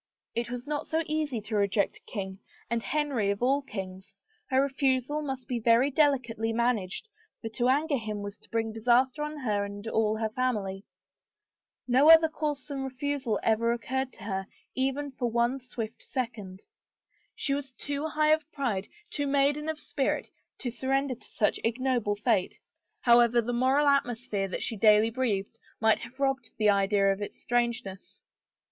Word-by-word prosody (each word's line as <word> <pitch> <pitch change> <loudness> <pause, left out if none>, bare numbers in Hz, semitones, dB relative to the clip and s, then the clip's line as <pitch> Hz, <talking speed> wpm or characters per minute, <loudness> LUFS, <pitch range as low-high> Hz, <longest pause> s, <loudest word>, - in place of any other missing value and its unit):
It 235 0 -2
was 245 +1 -5
not 295 0 -3
so 320 +1 0
easy 305 -7 -1
to 215 +1 -5
reject 200 -1 +1
a - - -19
king 190 -3 -5 0.3
and 235 0 +1
Henry 280 -7 0
of 200 +3 -1
all 275 +3 +3
kings; 195 -5 -8 0.3
her 260 -1 +3
refusal 275 +1 +1
must 270 -3 -5
be 245 -2 -1
very 235 +5 +4
delicately 250 -6 +2
managed 230 - 0 0.3
for 225 - -5
to 240 +3 0
anger 285 +1 +2
him 215 -2 -4
was 205 0 -7
to - - -19
bring 225 -1 -1
disaster 245 +5 +2
on 300 0 -3
her 210 -7 0
and 200 +2 -7
all 220 -1 +1
hef 220 -1 -2
family. 210 -6 -1 1.0
No 260 +5 +5
other 325 0 +9
course 300 -3 -3
than 280 -2 -4
refusal 265 -4 -2
ever 230 +1 +2
occurred 260 +2 -2
to - - -13
her 195 -2 -3 0.3
even 270 +2 -1
for 250 -2 -2
one 235 +3 +1
swift 235 -3 -6
second. 220 -8 -5 0.7
She 275 - -1
was 275 -1 -3
too 285 +3 -3
high 305 0 +2
of 310 0 +1
pride, 230 -9 -2 0.2
too 290 -1 -1
maiden 285 +2 +2
of 315 -1 -3
spirit 275 -2 -2 0.3
to 245 - -2
surrender 270 +2 0
to 235 - -13
such 210 - 0
ignoble 240 -2 0
fate, 210 -3 0 0.4
however 240 0 +5
the 240 +1 -1
moral 260 +4 +3
atmosphere 245 -7 +1
that 185 - -4
she 230 - -2
daily 215 +2 +5
breathed, 230 -3 -2 0.2
might 220 -1 +4
have 245 +3 -11
robbed 270 -4 -1
the 215 -1 +4
idea 200 0 +3
of 195 - -8
its 205 - -6
strangeness. 235 -5 -2
240 Hz, 170 wpm, -28 LUFS, 215-275 Hz, 1.0 s, other